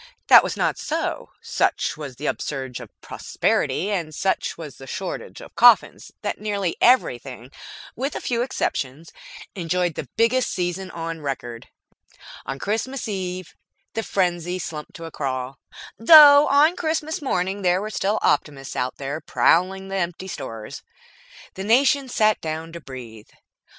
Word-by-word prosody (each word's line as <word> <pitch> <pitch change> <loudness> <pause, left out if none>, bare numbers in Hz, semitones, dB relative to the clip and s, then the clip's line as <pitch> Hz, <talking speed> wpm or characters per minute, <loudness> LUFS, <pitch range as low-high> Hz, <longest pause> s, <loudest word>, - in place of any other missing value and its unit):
That - - +9
was - - -4
not - - 0
so. - - -3
Such - - 0
was 145 -4 -8
the 145 - -8
upsurge 130 -3 -4
of - - -10
prosperity, 200 - -1
and 165 -6 -3
such 190 +3 -1
was 150 -6 -9
the 135 - -12
shortage - - -6
of - - -12
coffins, - - +4
that - - -3
nearly 200 -4 -2
everything 130 - +2 0.4
with 270 +4 -3
a - - -2
few 235 -1 -1
exceptions 160 - -3 0.4
enjoyed 180 -1 -1
the 135 - -7
biggest 240 +2 +2
season 180 +1 -3
on 165 -1 -6
record. 120 -5 -5 0.8
On 135 - -4
Christmas 225 - -3
Eve 185 -3 -5 0.4
the 225 - -1
frenzy 180 -3 -1
slumped 155 -4 -7
to 165 - -8
a 165 - -8
crawl, 130 -2 -4 0.4
though 290 +3 +9
on 300 +5 +4
Christmas 315 -2 -2
morning 195 -6 -1
there 180 -1 +2
were 215 +2 -5
still 210 +1 0
optimists 135 -3 0
out 125 0 -2 0.3
prowling 190 +3 +2
the 195 - -2
empty 175 +1 -3
stores. 115 - -7 0.7
The 190 - -6
nation 265 +5 +3
sat 215 -3 +2
down 160 +1 -5
to 170 - -8
breathe. 120 -6 -10
180 Hz, 145 wpm, -23 LUFS, 145-215 Hz, 0.8 s, That